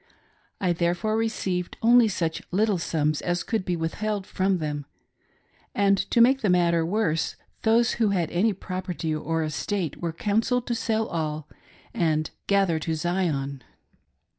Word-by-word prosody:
I 180 -3 +1
therefore 175 +5 0
received 190 -5 -2
only 240 0 +6
such 170 -5 -2
little 205 0 +1
sums 155 -2 0
as 175 0 -1
could 225 -4 -1
be 180 -1 -1
withheld 195 +5 -2
from 190 0 0
them, 150 -3 -4 0.9
and 200 -1 +4
to 240 - +2
make 265 +3 +5
the 210 - +1
matter 170 -2 +3
worse 165 -3 0 0.3
those 230 +1 +3
who 225 -3 +1
had 175 -5 0
any 205 +6 +2
property 185 -4 -4
or 160 +1 -1
estate 165 +2 -3
were 170 -1 -1
counselled 225 +7 0
to 240 - -1
sell 225 -1 0
all 155 -5 -3 0.5
and 155 -2 0 0.2
"gather 195 -5 +2
to 160 +1 -2
Zipn." 155 -5 -1
180 Hz, 145 wpm, -25 LUFS, 165-215 Hz, 0.9 s, only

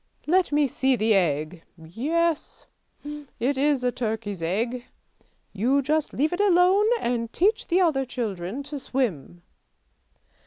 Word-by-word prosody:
Let 360 +2 +2
me 295 -1 +3
see 265 +1 +1
the 220 -1 +2
egg! 165 -2 0 0.2
Yes, 300 - -2 0.4
it 285 -3 -4
is 280 -1 +1
a 250 - +2
turkey's 220 -6 -4
egg! 230 +9 -2 0.7
You 255 +8 +1
just 305 +2 0
leave 305 +5 0
it 360 - 0
alone 385 +1 +4
and 235 - -2
teach 420 +5 +1
the 360 +2 +2
other 310 -7 +2
children 225 -2 -4
to 290 0 -6
swim." 175 - -3
260 Hz, 130 wpm, -25 LUFS, 215-300 Hz, 0.7 s, alone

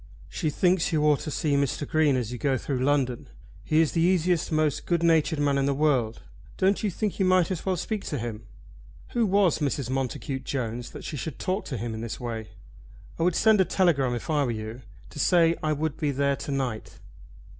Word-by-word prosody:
"She 155 - -2
thinks 180 +3 +2
you 155 -2 +1
ought 150 -2 +4
to - - -5
see 150 0 -1
Mr. 140 0 0
Green 155 -3 +3
as 125 -3 -2
you 125 - -6
go 135 +2 +1
through 130 +1 -3
London. 130 -4 0 0.4
He 155 +1 +3
is 160 - +1
the 165 - 0
easiest, 175 -1 +2
most 155 -2 0
good 170 -1 +1
natured 160 -1 +3
man 145 -1 +1
in 135 - +1
the 140 - +1
world. 135 -7 +1 0.3
Don't 195 +1 +2
you 210 - 0
think 210 +2 -3
you 190 - +3
might 185 -1 +3
as 180 - -3
well 185 -1 +1
speak 210 +4 -3
to 145 - -3
him?" 115 -2 -6 0.6
Who 235 -3 +1
was 195 -4 +3
Mrs. 140 -4 -1
Montacute 135 +1 -3
Jones 120 -3 -3
that - - -10
she 150 - -5
should 140 +3 -5
talk 185 +2 -2
to 130 - -4
him 115 +2 -4
in 110 - -5
this 115 -1 -5
way? 115 -3 -5 0.7
"I - - -2
would 175 0 +2
send 220 -3 +5
a - - +6
telegram 150 -9 +2
if 120 - -6
I 150 -2 +2
were 130 - -1
you, 110 +2 -5 0.3
to - - -9
say 170 +1 +4
I 155 - 0
would 150 0 -2
be 150 -3 -1
there 140 0 +1
to 140 - -6
night." 130 -5 -3
145 Hz, 220 wpm, -26 LUFS, 130-170 Hz, 0.7 s, a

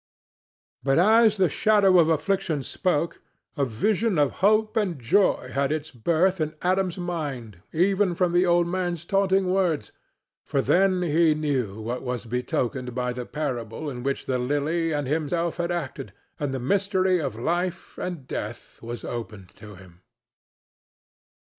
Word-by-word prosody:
But 135 -1 +2
as 215 +4 +5
the 190 -2 +4
shadow 195 +2 +4
of 165 -1 +4
Affliction 165 -2 0
spoke 170 +1 -1 0.3
a 145 - 0
vision 190 - 0
of 145 -2 +3
hope 215 +2 +3
and 190 -9 0
joy 125 - +2
had 140 0 0
its 155 0 -3
birth 170 +8 +1
in 155 0 -2
Adam's 185 0 +1
mind 140 - -5
even 185 +2 +2
from 180 0 +1
the 175 +1 +4
old 175 -1 +3
man's 175 -2 -2
taunting 195 -1 +2
words, 180 - 0 0.5
for 140 - -1
then 185 +5 +3
he 160 -1 +3
knew 130 -9 -2
what 120 +3 -4
was 125 -2 -4
betokened 125 +1 -2
by 125 -1 -1
the 125 -1 -6
parable 130 -1 -4
in 125 -2 -6
which 135 +2 -2
the 130 -1 -1
Lily 145 +6 0
and 145 -2 -1
himself 165 +4 -1
had 175 0 -1
acted, 140 - -4 0.3
and 145 -2 -2
the 135 - -3
mystery 190 - +1
of 135 -7 -3
life 175 +9 -2
and 175 -7 -5
death - - -7
was 120 +1 -7
opened 105 -6 -6
to 105 -1 -13
him. 90 -1 -16
160 Hz, 155 wpm, -25 LUFS, 125-185 Hz, 0.5 s, as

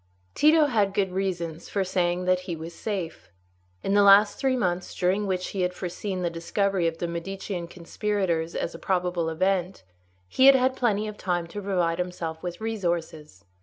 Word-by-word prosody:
Tito 310 0 +5
had 210 -8 +1
good 195 -2 +1
reasons 175 -4 -3
for 200 - 0
saying 180 -1 0
that 185 0 +3
he 170 - -1
was 165 +1 -8
safe. 170 - -5 0.5
In 195 - 0
the 205 - +5
last 200 +1 +6
three 265 -1 +2
months, 180 -6 -2
during 195 +3 +1
which 185 -1 -2
he 195 - -3
had 180 0 0
foreseen 185 +1 -4
the 175 - +1
discovery 180 +2 0
of 165 0 -2
the 175 - -3
Medicean 175 +1 -5
conspirators 175 -1 -2
as - - -2
a - - -9
probable 180 -3 0
event, 185 - -1 0.4
he 260 - +4
had 275 - +9
had 260 0 +2
plenty 215 -4 0
of 210 -1 -8
time 175 -2 -1
to 205 +5 -7
provide 180 -4 0
himself 170 -3 -4
with 175 -1 -5
resources. 170 - -3
180 Hz, 180 wpm, -26 LUFS, 170-200 Hz, 0.5 s, had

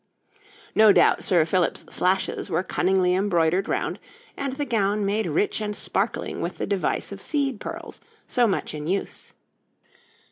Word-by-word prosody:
No 215 -1 +7
doubt - - +4
Sir 170 -4 +3
Philip's 175 +1 0
slashes 190 +2 0
were 170 +1 0
cunningly 185 -1 +1
embroidered 180 -1 +1
round, - - -2 0.4
and 275 -1 -3
the 290 +2 -3
gown 210 -4 0
made 210 +2 0
rich 400 - 0
and 210 -1 -3
sparkling 205 +3 -2
with 175 - -4
the - - -2
device 200 -2 -1
of - - -8
seed 275 -7 -1
pearls - - -8 0.2
so 245 -2 +2
much 195 - -2
in 150 0 -5
use. 195 +3 -3
195 Hz, 150 wpm, -24 LUFS, 180-220 Hz, 0.4 s, No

